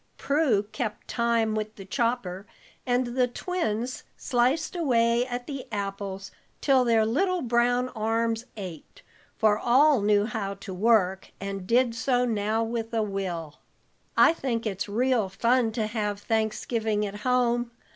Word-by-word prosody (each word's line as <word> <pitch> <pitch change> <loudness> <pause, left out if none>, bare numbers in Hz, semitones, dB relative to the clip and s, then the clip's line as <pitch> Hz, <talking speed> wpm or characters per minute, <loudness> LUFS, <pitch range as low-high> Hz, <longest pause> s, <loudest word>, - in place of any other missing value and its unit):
Prue 280 -8 +2
kept 215 0 -5
time 235 -2 +1
with 215 0 -3
the 195 - -10
chopper, 205 -4 -2 0.4
and 245 0 0
the 250 -1 +3
twins 250 -5 -3 0.2
sliced 260 +8 +1
away 240 -6 +2
at 245 -1 -4
the 275 -2 -6
apples 195 -1 -4 0.3
till 270 -3 +4
their 225 -2 +3
little 360 - +1
brown 245 +1 +2
arms 225 0 -1
ached, 190 - -9 0.3
for 215 -1 +3
all 265 +2 +4
knew 205 0 +3
how 215 -4 -3
to 195 -1 -8
work, 190 -2 +2
and 195 -1 -5
did 240 0 +3
so 245 +2 +1
now 220 -1 0
with 225 0 -3
a 220 - +2
will. 180 -7 -4 0.6
"I - - +7
think 240 -7 -2
it's 205 -1 -3
real 235 -1 +1
fun 235 +3 +2
to 220 -1 -1
have 210 -2 -2
Thanksgiving 220 0 -1
at 205 0 -5
home. 240 0 +1
230 Hz, 145 wpm, -26 LUFS, 210-245 Hz, 0.6 s, I